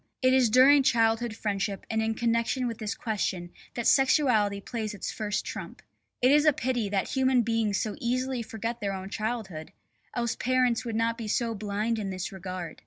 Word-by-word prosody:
It 255 0 +5
is 255 -3 +4
during 270 +5 +7
childhood 225 -2 +2
friendship 200 -2 -2
and 220 0 0
in 220 0 -1
connection 235 +2 0
with 230 -2 -5
this 215 0 -3
question 190 -6 -3 0.2
that 235 - -3
sexuality 250 -8 +3
plays 220 0 -4
its 200 - -4
first 210 -1 -3
trump. - - -7 0.4
It 255 - +6
is 295 +1 +5
a 305 -1 +5
pity 245 -5 -1
that 195 -1 -1
human 260 -2 +2
beings 225 -3 0
so 215 - -2
easily 255 +1 -1
forget 230 +1 -5
their 200 -1 -1
own 190 +1 -6
childhood, 210 -7 -4 0.4
else 235 -1 -1
parents 255 -1 +1
would 230 -2 -3
not 230 +1 0
be 225 - -4
so 230 +2 0
blind 215 +2 -2
in 200 -2 -3
this 185 -1 -4
regard. 185 -3 -7
225 Hz, 185 wpm, -28 LUFS, 205-245 Hz, 0.4 s, during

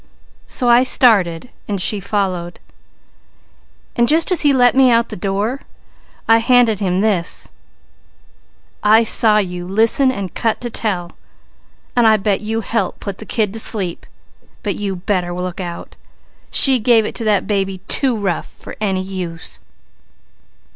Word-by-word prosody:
So 250 - -2
I 240 +1 +5
started 220 -7 +3 0.2
and 200 -2 -3
she 200 +3 +1
followed, 185 -3 -3 1.4
and 235 - +2
just 325 +6 +2
as 365 - +2
he 290 - +3
let 245 -2 +3
me 265 -1 +4
out 230 -1 +2
the - - -6
door 205 +8 -3 0.7
I 225 0 +5
handed 235 -3 +2
him 185 -2 -1
this: 195 -6 -1 1.3
'I 220 +2 +4
saw 220 -1 +4
you 180 -3 -3
listen 225 +7 +3
and 195 -7 -6
cut 225 -1 -2
to 240 -1 -5
tell, 180 -7 -3 0.8
and 240 -2 +3
I 220 0 +4
bet 200 -1 -1
you 225 +1 -3
helped 220 -2 -3
put 200 -1 -7
the 215 - -10
kid 210 -4 -1
to 225 - -1
sleep! 190 -6 -1 0.6
But 205 -3 -2
you 200 -2 -4
better 180 -1 -2
look 180 +1 -5
out! 175 -2 -8 0.5
She 265 -2 +6
gave 225 -1 +3
it - - -5
to 230 - -2
that 205 -3 +1
baby 195 -2 -2
too 260 -4 +1
rough 195 -5 -3
for - - -13
any 190 -3 -1
use!' 180 -3 -7
210 Hz, 155 wpm, -17 LUFS, 185-230 Hz, 1.4 s, She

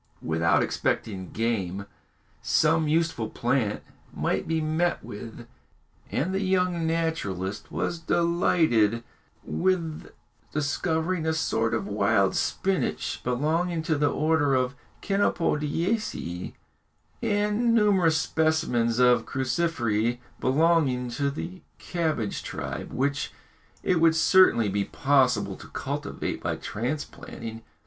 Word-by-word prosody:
Without 80 +1 +2
expecting 95 -4 -2
game, 100 -4 -2 0.6
some 160 0 +3
useful 155 -8 0
plant 120 -4 0 0.3
might - - -1
be 160 0 +1
met 160 +3 0
with, 115 +3 -8 0.7
and 175 +8 -1
the 195 - 0
young 180 -3 +1
naturalist 105 - -2
was 170 - -2
delighted 160 -10 +2 0.4
with 170 -4 -1 0.4
discovering 160 +3 -1
a 160 - +2
sort 115 -7 0
of 110 - -2
wild 100 -1 +2
spinage, 185 +6 -1
belonging 160 +7 0
to 160 -1 +1
the 145 0 +2
order 150 -1 +2
of 130 0 +1 0.3
chenopodiaceæ, 170 - -1 0.7
and 210 +3 +1
numerous 190 -7 +4
specimens 155 -9 +1
of 125 -1 +4
cruciferæ, 120 -5 0 0.2
belonging 135 -3 +2
to 140 +3 0
the 175 +6 -6 0.2
cabbage 155 - -2
tribe, - - -5
which 140 +2 -1 0.5
it 180 -3 +2
would 165 -1 +5
certainly 160 - +5
be 100 0 0
possible 130 -3 +2
to - - -12
cultivate - - -4
by - - -1
transplanting. 115 -2 -5
150 Hz, 105 wpm, -26 LUFS, 115-165 Hz, 0.7 s, would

